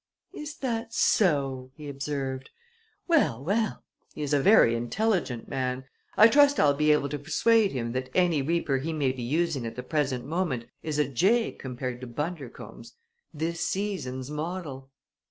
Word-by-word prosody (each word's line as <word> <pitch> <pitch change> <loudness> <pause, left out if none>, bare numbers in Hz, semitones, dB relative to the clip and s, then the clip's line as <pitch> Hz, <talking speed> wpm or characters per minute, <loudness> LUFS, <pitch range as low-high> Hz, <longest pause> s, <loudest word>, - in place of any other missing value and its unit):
"Is 300 0 -7
that 230 -3 -3
so!" 135 -9 +2
he 150 -2 -9
observed. 135 -2 -4 0.6
"Well, 155 - +2
well! 215 +7 -1 0.3
He 150 - -4
is 145 0 -2
a 145 - +3
very 195 - +6
intelligent 135 - -1
man. 130 0 -2 0.3
I 215 - +9
trust 285 +3 +5
I'll 145 -1 +5
be 150 +1 +3
able 150 -2 +2
to 145 - -4
persuade 215 +8 +3
him 115 -3 -3
that 130 +1 -3
any 175 -5 +3
reaper 145 -2 0
he 160 +5 -3
may 145 -4 +1
be 130 -1 -7
using 150 +2 0
at 115 - -5
the 125 - -5
present 135 -3 -1
moment 155 -6 -2 0.2
is 155 -2 -3
a 150 -3 +2
jay 195 - +2
compared 125 -1 -6
to 130 - -6
Bundercombe's 145 +1 -6 0.4
this 165 +2 -3
season's 150 -10 -3
model!" 150 -4 -5
150 Hz, 160 wpm, -27 LUFS, 130-180 Hz, 0.6 s, I